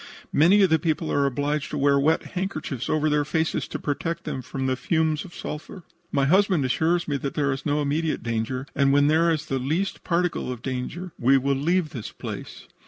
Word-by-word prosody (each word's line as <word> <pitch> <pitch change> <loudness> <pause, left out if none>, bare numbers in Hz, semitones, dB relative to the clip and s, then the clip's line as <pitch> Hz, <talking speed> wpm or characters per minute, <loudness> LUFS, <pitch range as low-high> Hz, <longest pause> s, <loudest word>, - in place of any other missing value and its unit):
Many 185 +7 +6
of 190 - +3
the 160 - +4
people 160 0 -1
are 140 -1 +2
obliged 145 +2 -1
to 150 - -4
wear 140 0 +3
wet 155 +4 +2
handkerchiefs 155 - -3
over 155 0 +2
their 150 -1 +2
faces 160 +2 -1
to - - -4
protect 165 +3 -3
them 130 - -4
from 130 +2 -4
the 130 0 +1
fumes 160 +2 0
of 175 - -12
sulphur. 155 +4 -7 0.3
"My 140 -1 +2
husband 185 -1 +3
assures 165 +7 +1
me 145 -2 0
that 140 0 -4
there 140 -2 +1
is 135 +3 -3
no 145 0 +1
immediate 155 +3 -1
danger, 115 +3 -2
and 140 -1 +3
when 145 +1 +4
there 165 +2 +4
is 155 -2 0
the 135 -3 -2
least 160 +10 -2
particle 175 -6 0
of 120 -2 -7
danger 135 +8 -4
we 135 +3 +5
will 140 +1 +1
leave 160 +3 +1
the 125 -7 -5 0.2
place. - - -7
150 Hz, 210 wpm, -25 LUFS, 135-165 Hz, 0.3 s, Many